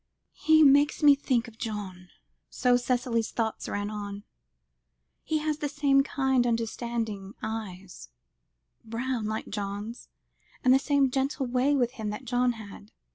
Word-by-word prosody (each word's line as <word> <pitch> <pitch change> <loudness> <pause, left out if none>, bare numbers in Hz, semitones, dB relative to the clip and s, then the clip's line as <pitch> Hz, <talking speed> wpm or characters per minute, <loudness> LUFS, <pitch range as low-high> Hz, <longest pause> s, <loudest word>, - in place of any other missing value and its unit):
"He 315 0 +4
makes 290 +2 +4
me 290 -1 +9
think 255 -4 0
of 230 -1 -14
John," 195 -5 -6 0.4
so 250 -1 +2
Cicely's 245 -2 0
thoughts 225 -2 -3
ran; 205 0 -4 1.0
"he 315 - 0
has 305 0 -2
the 290 - -2
same 275 -1 +3
kind 265 -3 +1
understanding 230 -3 -3
eyes 195 - -6 0.7
brown, 230 0 -3
like 215 0 -4
John's 205 +3 -5 0.5
and 255 -1 +6
the 265 - +5
same 280 -2 +2
gentle 270 +1 -1
way 255 +3 +2
with 245 -3 +1
him 220 -5 -5
that 210 +5 -6
John 250 0 +1
had. 205 - -11
240 Hz, 135 wpm, -28 LUFS, 215-270 Hz, 1.0 s, me